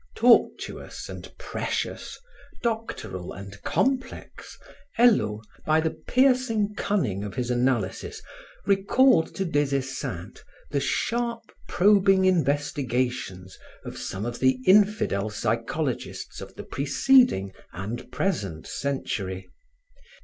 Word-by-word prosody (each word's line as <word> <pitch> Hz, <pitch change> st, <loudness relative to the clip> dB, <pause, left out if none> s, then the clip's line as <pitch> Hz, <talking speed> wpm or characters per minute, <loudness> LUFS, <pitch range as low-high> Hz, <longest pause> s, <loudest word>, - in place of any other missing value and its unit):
Tortuous 235 Hz, 0 st, +2 dB
and -, -, -8 dB
precious, -, -, -4 dB, 0.5 s
doctoral 165 Hz, -, -3 dB
and 100 Hz, +1 st, -10 dB
complex, 265 Hz, 0 st, -2 dB, 0.4 s
Hello, 110 Hz, -, +3 dB, 0.2 s
by 155 Hz, +1 st, +3 dB
the 160 Hz, 0 st, 0 dB
piercing 250 Hz, -5 st, +2 dB
cunning 130 Hz, -, -1 dB
of 105 Hz, -, -6 dB
his 125 Hz, -1 st, -1 dB
analysis, 120 Hz, -6 st, -1 dB, 0.5 s
recalled 200 Hz, +1 st, +3 dB
to 195 Hz, -, -1 dB
Des 145 Hz, -4 st, +1 dB
Esseintes 130 Hz, -10 st, -5 dB, 0.3 s
the 140 Hz, -, +1 dB
sharp, 235 Hz, +9 st, -1 dB, 0.2 s
probing 195 Hz, -1 st, +4 dB
investigations 130 Hz, -, 0 dB, 0.3 s
of -, -, -7 dB
some 95 Hz, +3 st, -5 dB
of 120 Hz, 0 st, -4 dB
the 130 Hz, 0 st, +3 dB
infidel 195 Hz, -, +3 dB
psychologists 115 Hz, +6 st, -3 dB
of -, -, -10 dB
the -, -, -7 dB
preceding 140 Hz, -, +3 dB, 0.2 s
and 100 Hz, +7 st, -6 dB
present 100 Hz, -, -2 dB
century. 100 Hz, -9 st, -3 dB
140 Hz, 100 wpm, -26 LUFS, -, 0.5 s, probing